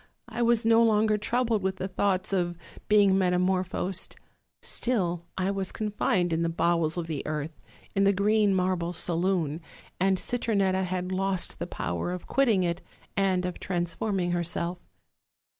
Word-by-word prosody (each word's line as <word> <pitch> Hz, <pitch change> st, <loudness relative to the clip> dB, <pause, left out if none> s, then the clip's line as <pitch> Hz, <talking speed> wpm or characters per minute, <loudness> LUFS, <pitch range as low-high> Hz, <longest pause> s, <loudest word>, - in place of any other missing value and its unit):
I 240 Hz, +1 st, -3 dB
was 235 Hz, -1 st, +3 dB
no 225 Hz, 0 st, +5 dB
longer 215 Hz, -1 st, +3 dB
troubled 230 Hz, 0 st, 0 dB
with 190 Hz, 0 st, -1 dB
the 190 Hz, -, -4 dB
thoughts 190 Hz, 0 st, 0 dB
of 175 Hz, -2 st, 0 dB, 0.3 s
being 205 Hz, -2 st, +5 dB
metamor 185 Hz, 0 st, +2 dB
phosed; 185 Hz, 0 st, -3 dB, 0.5 s
still 175 Hz, -9 st, 0 dB
I 190 Hz, +1 st, 0 dB
was 195 Hz, -1 st, -2 dB
confined 200 Hz, -5 st, 0 dB
in 165 Hz, -, 0 dB
the 170 Hz, -, +1 dB
bowels 165 Hz, -1 st, +1 dB
of 170 Hz, -, -2 dB
the 160 Hz, -3 st, -3 dB
earth, 155 Hz, +1 st, -4 dB, 0.3 s
in 195 Hz, -, +2 dB
the 200 Hz, -, +5 dB
green 205 Hz, 0 st, +2 dB
marble 180 Hz, -2 st, 0 dB
saloon, 170 Hz, -2 st, +1 dB, 0.4 s
and 190 Hz, +1 st, +3 dB
Citronetta 195 Hz, -5 st, 0 dB
had 180 Hz, 0 st, -3 dB
lost 190 Hz, 0 st, -1 dB
the -, -, -3 dB
power 85 Hz, -, -3 dB
of 180 Hz, -, -6 dB
quitting 230 Hz, -9 st, +2 dB
it 170 Hz, +1 st, -1 dB, 0.3 s
and 190 Hz, -2 st, +1 dB
of 180 Hz, -, -4 dB
transforming 175 Hz, +1 st, -1 dB
herself. 175 Hz, 0 st, -1 dB
185 Hz, 155 wpm, -27 LUFS, 175-200 Hz, 0.5 s, no